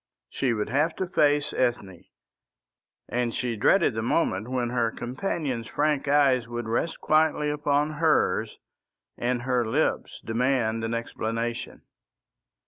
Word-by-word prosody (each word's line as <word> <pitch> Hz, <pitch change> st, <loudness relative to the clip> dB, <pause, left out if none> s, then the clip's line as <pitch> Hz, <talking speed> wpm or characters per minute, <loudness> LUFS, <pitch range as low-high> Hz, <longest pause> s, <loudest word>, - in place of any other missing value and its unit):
She 130 Hz, -3 st, 0 dB
would 105 Hz, -1 st, -2 dB
have 150 Hz, +6 st, +1 dB
to 190 Hz, -, -2 dB
face 150 Hz, -4 st, +2 dB
Ethne, 105 Hz, -8 st, -2 dB, 1.0 s
and 120 Hz, -1 st, -1 dB
she 120 Hz, -2 st, -2 dB
dreaded 120 Hz, -, +3 dB
the 110 Hz, -, -2 dB
moment 110 Hz, -, 0 dB
when 125 Hz, -2 st, -1 dB
her 120 Hz, -2 st, +1 dB
companion's 125 Hz, -, -3 dB
frank 150 Hz, 0 st, 0 dB
eyes 135 Hz, -4 st, +3 dB
would 120 Hz, -1 st, -5 dB
rest 120 Hz, +9 st, -1 dB
quietly 155 Hz, -1 st, +2 dB
upon 150 Hz, 0 st, +1 dB
hers 155 Hz, +1 st, +1 dB, 0.6 s
and 120 Hz, 0 st, -1 dB
her 125 Hz, -1 st, +1 dB
lips 125 Hz, +8 st, -1 dB
demand 115 Hz, -1 st, 0 dB
an 115 Hz, +1 st, -1 dB
explanation. 115 Hz, 0 st, -4 dB
125 Hz, 130 wpm, -26 LUFS, 115-150 Hz, 1.0 s, dreaded